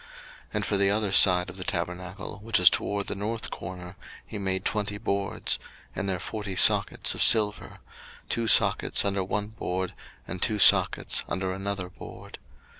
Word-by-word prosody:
02:036:025 - - -20 0.5
And - - -1
for 100 - 0
the 100 0 +2
other 105 -1 -1
side 90 -2 +5
of - - -13
the 95 - -5
tabernacle, 90 +4 -5
which 110 -1 +1
is 90 - +7
toward 100 -1 -2
the - - -5
north 110 +3 -4
corner, 90 0 -9 0.3
he 105 - -7
made 95 -1 -2
twenty 105 -1 -2
boards, 100 -1 -2
02:036:026 - - -18 0.3
And 100 - -3
their 95 -2 -2
forty 100 0 -6
sockets - - +2
of - - -6
silver; 105 -2 +4 0.5
two 115 -1 -2
sockets - - +3
under 100 -1 -1
one 105 +2 -4
board, 95 -4 -5 0.3
and 90 0 -7
two 110 - 0
sockets 100 - +4
under 95 0 -3
another 95 -1 -5
board. 90 - -12
100 Hz, 175 wpm, -26 LUFS, 95-105 Hz, 0.5 s, is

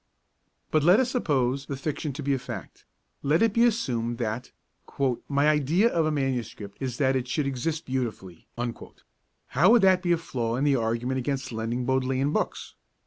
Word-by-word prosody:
But 155 - +3
let 175 +7 +6
us 255 -1 +1
suppose 140 - 0
the 140 - -4
fiction 150 +1 -3
to 145 +3 -6
be 140 +1 +1
a 135 - 0
fact; 125 - -8 0.4
let 150 +7 +2
it 225 -3 +3
be 235 +2 +4
assumed 120 - 0
that 115 +1 -3 0.8
'my 140 +1 +2
idea 155 - +3
of 165 -7 +1
a - - +1
MS. 135 -6 -1 0.2
is 130 -3 -3
that 135 -2 +2
it 130 -1 -1
should 140 +3 -1
exist 140 +4 -2
beautifully'; 115 -9 -4 1.0
how 165 +8 +4
would 230 -2 +6
that 185 -1 +5
be 175 -1 0
a 170 - +4
flaw 120 -8 -3
in 130 - -1
the 145 -2 +3
argument 120 +2 -1
against 135 0 -3
lending 115 +2 -2
Bodleian 130 +2 +1
books? - - -2
135 Hz, 180 wpm, -26 LUFS, 125-155 Hz, 1.0 s, let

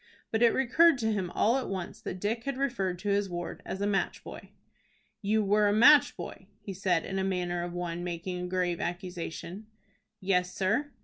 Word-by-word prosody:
But 220 - 0
it 235 - +7
recurred 275 +5 +4
to 220 -2 0
him 190 -4 -2
all 225 +7 +2
at 265 - -3
once 185 -3 -5
that 185 - -5
Dick 225 +5 -2
had 275 -2 -2
referred 195 -10 -1
to 205 +3 -4
his 200 0 +1
ward 175 -1 -5
as 190 - -4
a - - +1
match 200 -1 -1
boy. - - -10 0.7
"You 215 +1 +1
were 205 +1 +3
a 205 - +3
match 260 +8 +6
boy?" - - -8
he 195 - -7
said, 180 -3 0
in 190 - -4
the 190 - 0
manner 180 -2 -1
of 175 0 -5
one 175 -1 -4
making 180 +1 -4
a 180 - -3
grave 180 -1 -1
accusation. 175 +2 -5 0.5
"Yes, 180 -2 0
sir." 225 +10 0
195 Hz, 200 wpm, -29 LUFS, 180-220 Hz, 0.7 s, it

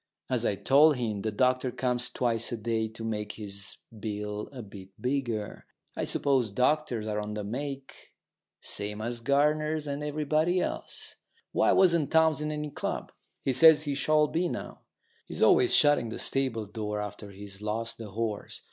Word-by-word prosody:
As 120 -2 +1
I 100 - +1
told 145 +8 +5
him, 110 -5 -2
the 110 - -1
doctor 130 +3 +2
comes 125 0 -1
twice 120 -2 +1
a 120 - -2
day 110 0 -1
to 110 +1 -10
make 105 -2 -3
his 100 -2 -6 0.2
bill 105 -1 -4
a 130 -4 -8
bit 100 -2 -11
bigger. 125 -5 -2 0.3
I - - -2
suppose 130 -6 +1
doctors 125 -1 +1
are 105 -1 -2
on 105 0 -4
the 105 - -3
make, 135 +5 -6 0.5
same 105 +1 -1
as 120 +2 -3
gardeners 150 +4 +1
and 145 0 -3
everybody 155 +4 +1
else. - - -4 0.3
Why - - +3
wasn't 170 -6 +4
Townes 160 -2 +3
in 150 0 -2
any 150 -1 -4
club? - - -4 0.3
He 135 - +1
says 155 +3 +7
he 145 -2 -1
shall 150 +2 +3
be 165 +4 -1
now. - - -6 0.5
He's - - -2
always 375 -2 +5
shutting 145 -6 +4
the - - -5
stable 130 -5 0
door 105 0 -4
after 105 0 -6
he's 100 0 -11
lost 115 +2 -3
the 110 -2 -7
horse. 110 0 -4
120 Hz, 170 wpm, -29 LUFS, 105-145 Hz, 0.5 s, says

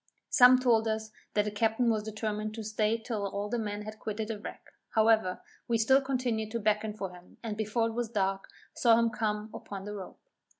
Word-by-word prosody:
Some 255 -2 +8
told 235 -3 +3
us 220 0 -2 0.2
that 210 0 +3
the 210 - -2
captain 225 +3 +2
was 215 -1 0
determined 215 0 -3
to 225 - -5
stay 215 +1 +1
till 220 -3 -3
all 200 +1 -3
the 240 +2 -1
men 210 -1 -3
had 215 +1 -8
quitted 215 +1 -4
the 220 -2 -3
wreck - - -9 0.2
however, 220 -4 +3 0.3
we 235 - +2
still 265 +5 +5
continued 250 -5 -1
to 230 - 0
beckon 210 0 0
for 195 -3 -4
him, 180 0 -16
and 220 -2 -3
before 220 +2 0
it - - -6
was 235 -1 -2
dark, 195 -3 -1 0.3
saw 230 -2 +5
him 230 0 +2
come 215 -1 -2
upon 195 -1 -7
the 210 - -5
rope. 195 -3 -8
220 Hz, 210 wpm, -30 LUFS, 210-230 Hz, 0.3 s, Some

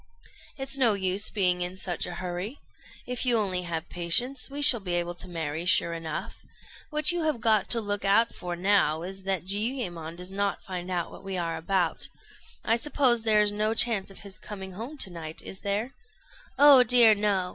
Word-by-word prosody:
"It's 270 0 -2
no 235 -5 +3
use 190 +1 +1
being 180 -3 0
in 180 +1 -4
such 185 -1 -2
a 175 - -6
hurry. 185 +8 -5 0.5
If 250 0 -4
you 245 -2 +2
only 190 -4 -1
have 170 -2 -5
patience, 240 +12 0
we 280 +1 -7
shall 275 -5 +9
be 180 -3 -4
able 175 0 -2
to 175 - -6
marry, 160 -2 -4
sure 170 -1 +2
enough. 165 -2 -6 0.5
What 300 0 +3
you 350 0 -2
have 310 -6 -1
got 220 -3 +1
to 235 - 0
look 205 -2 -3
out 205 +4 +3
for 175 -1 -6
now 175 -4 +1
is, 190 +1 -8
that 190 -3 -2
Jiuyémon 195 -6 -3
does 180 +1 -7
not 200 -1 -2
find 180 -1 -6
out 175 -2 -3
what - - -13
we 195 -1 -4
are 170 -2 -2
about. 185 +1 -1 0.6
I 225 - +2
suppose 250 -3 +2
there 215 -1 +3
is 205 - 0
no 215 +2 -1
chance 220 -5 +3
of 195 - -12
his 200 -1 -7
coming 190 -2 -9
home 230 +11 -8
to 195 -8 +1
night, 160 -2 -7
is 190 - -7
there?" 205 +6 -3 0.6
"Oh 285 -2 +8
dear, 235 -2 +6
no! 200 -3 -1
195 Hz, 200 wpm, -26 LUFS, 180-230 Hz, 0.6 s, shall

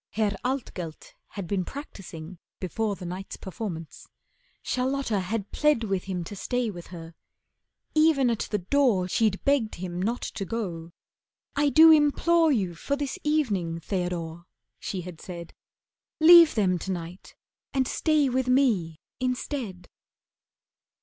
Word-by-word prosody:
Herr 210 -2 0
Altgelt 225 - -4
had 200 -3 -6
been 190 +1 -1
practising 180 - -9 0.2
before 205 +3 -2
The 185 - -9
night's 185 +2 -6
performance. 185 -5 -7 0.6
Charlotta 255 -4 0
had 200 +2 -3
plead 300 -6 +2
With 195 -4 -2
him 185 -3 -3
to 205 - -8
stay 245 +2 -1
with 175 -3 -10
her. 165 -2 -10 0.8
Even 310 -5 +4
at 225 - -2
the 210 - 0
door 205 -2 +2
She'd 205 +1 +1
begged 275 -6 +2
him 180 0 -5
not 230 +5 -1
to 200 - -4
go. 175 -6 -4 0.6
"I 290 0 +3
do 320 +3 +8
implore 315 +2 +4
You 195 -9 0
for 280 +12 -2
this 285 -1 -4
evening, 205 - 0
Theodore," 170 -2 -3 0.3
she 190 - -4
had 175 -2 -9
said. 170 -2 -8 0.7
"Leave 335 0 +9
them 185 -5 +2
to 190 - -4
night, 175 +1 -7 0.4
and 265 -2 +1
stay 305 -3 +2
with 255 0 0
me 220 - +2 0.2
instead." 250 -7 -3
205 Hz, 135 wpm, -27 LUFS, 180-270 Hz, 0.8 s, Leave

